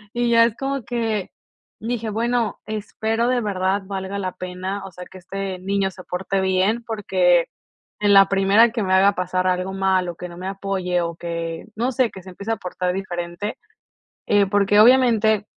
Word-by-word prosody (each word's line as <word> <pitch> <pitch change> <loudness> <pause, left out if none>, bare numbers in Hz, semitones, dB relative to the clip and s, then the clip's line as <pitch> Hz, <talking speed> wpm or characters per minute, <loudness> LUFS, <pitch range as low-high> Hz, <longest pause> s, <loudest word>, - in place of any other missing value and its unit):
Y 240 0 +1
ya 230 0 +6
es 230 -1 -1
como 275 -2 -3
que, 225 -4 -2 0.5
dije: 225 -1 -3
"Bueno, 235 +1 -1
espero 220 +2 -2
de 250 -1 +1
verdad 195 -1 0
valga 195 0 -4
la 185 -2 -2
pena." 185 +2 -5
O 195 - -9
sea, 180 +1 -10
que 190 - -12
este, 190 +1 -5
niño 195 +1 0
se 185 -1 -12
porte 190 +2 -2
bien, 190 +5 +1
porque 185 -6 +2 0.5
en 205 -1 +3
la 195 0 +8
primera 200 +4 +4
que 230 -4 -2
me 185 0 0
haga 195 +2 +5
pasar 185 0 -1
algo 185 +1 -1
malo, 190 -2 +1
o - - -23
que 180 0 -8
no 170 - -11
me 185 - -6
apoye, 190 -2 -2
o 170 -1 -3
que, 170 -1 -5
no 240 +4 0
sé, 255 -2 +1
que 190 - -10
se 185 - -12
empiece 200 +5 -6
a - - +1
aportar 180 -1 -3
diferente. 175 +1 -4 0.7
Eh, 205 -1 +3
porque 205 +1 +3
obviamente, 220 -4 +4
195 Hz, 190 wpm, -22 LUFS, 185-220 Hz, 0.7 s, la